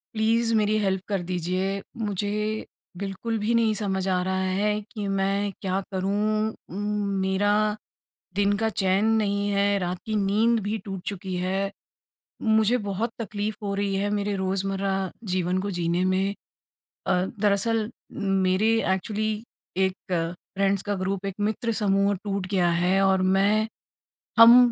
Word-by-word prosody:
Please 230 +1 +2
मेरी 215 0 +2
help 190 -2 0
कर 200 -3 -1
दीजिए, 185 +2 -1 0.2
मुझे 205 -2 -1 0.6
बिल्कुल 200 +4 -3
भी 215 +3 0
नहीं 225 -2 +3
समझ 195 -2 -1
आ 185 -1 +2
रहा 190 0 0 0.2
है 210 +1 +2 0.2
कि 210 -3 -4
मैं 195 +1 +1
क्या 190 -1 0
करूँ? 210 +3 0 0.2
उम, 205 +2 -2 0.2
मेरा 190 +2 +2 0.8
दिन 200 0 +3
का 225 +1 +1
चैन 190 +2 +2 0.2
नहीं 200 0 0
है, 200 0 +2
रात 180 -1 -2
की 220 - -2
नींद 215 +3 +3
भी 210 +2 -1
टूट 195 -2 -5
चुकी 190 -1 -5
है। 195 +1 -1 0.7
मुझे 220 +1 +3
बहुत 210 +4 -1
तकलीफ 210 -1 -3
हो 200 -1 -1
रही 200 -1 0
है 200 +1 0
मेरे 205 0 0
रोजमर्रा 195 +1 -1 0.4
जीवन 185 0 +1
को 200 +1 -3
जीने 170 +1 +1
में 190 +1 +1 0.7
अ, - - +2
दरअसल 210 +2 +1 0.6
मेरे 190 +4 +3 0.2
एक्चुअली 215 +3 -1 0.6
एक 190 - -5 0.2
फ्रेंड्स 185 +3 -1
का 205 0 -1
ग्रुप 195 +1 -2
एक 195 -1 -3
मित्र 230 +2 -1
समूह 200 0 +3
टूट 200 -2 -2
गया 180 -3 +3
है 185 +2 +3
और 190 -1 +3
मैं 210 +3 +3 0.7
हम 230 +1 +11
200 Hz, 145 wpm, -26 LUFS, 190-210 Hz, 0.8 s, हम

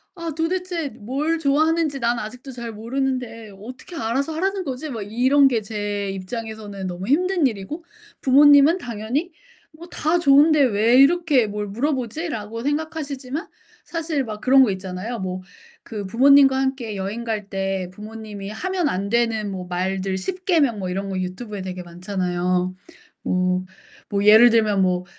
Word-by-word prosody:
'아 335 -2 -5
도대체 340 -1 -2
뭘 285 +10 -2
좋아하는지 310 0 +1
난 235 0 0
아직도 250 +5 -8
잘 235 -2 -6
모르는데 230 -1 -3
어떻게 255 - -10
알아서 270 +5 -1
하라는 385 +3 -1
거지?' 285 0 -5
막 225 -5 -5
이런 260 +7 +4
게 240 -4 +1
제 205 -2 -3
입장에서는 205 0 -6
너무 180 +2 -6
힘든 350 +3 +2
일이고 235 - -6 0.4
부모님은 285 +4 +6
당연히 245 - -3 0.4
'뭐 335 +3 -12
다 330 +2 0
좋은데 300 0 +5
왜 230 0 +3
이렇게 285 -4 +4
뭘 210 0 -4
물어보지?'라고 235 - -3
생각하시지만 290 0 -3 0.4
사실 320 -4 -2
막 215 -3 -6
그런 265 +2 +6
거 230 - +2
있잖아요. 190 +5 -5
뭐 185 -1 -4 0.4
그 210 -3 -6
부모님과 270 +4 +5
함께 265 -5 -2
여행 200 +5 -4
갈 215 -3 -3
때 195 -2 -2
부모님이 210 -1 -8
하면 360 - -2
안 195 +2 -2
되는 225 -3 0
뭐 185 -1 -6
말들 190 +1 -2
십계명 315 - 0
뭐 185 -2 -3
이런 195 +2 -3
거 190 - -3
유튜브에 195 +3 -5
되게 185 -1 -6
많잖아요. 180 0 -2 0.5
뭐 185 0 0 0.4
뭐 200 0 0
예를 220 +3 +8
들면 215 -3 +3
뭐 180 -1 0
230 Hz, 320 characters per minute, -22 LUFS, 200-285 Hz, 0.5 s, 예를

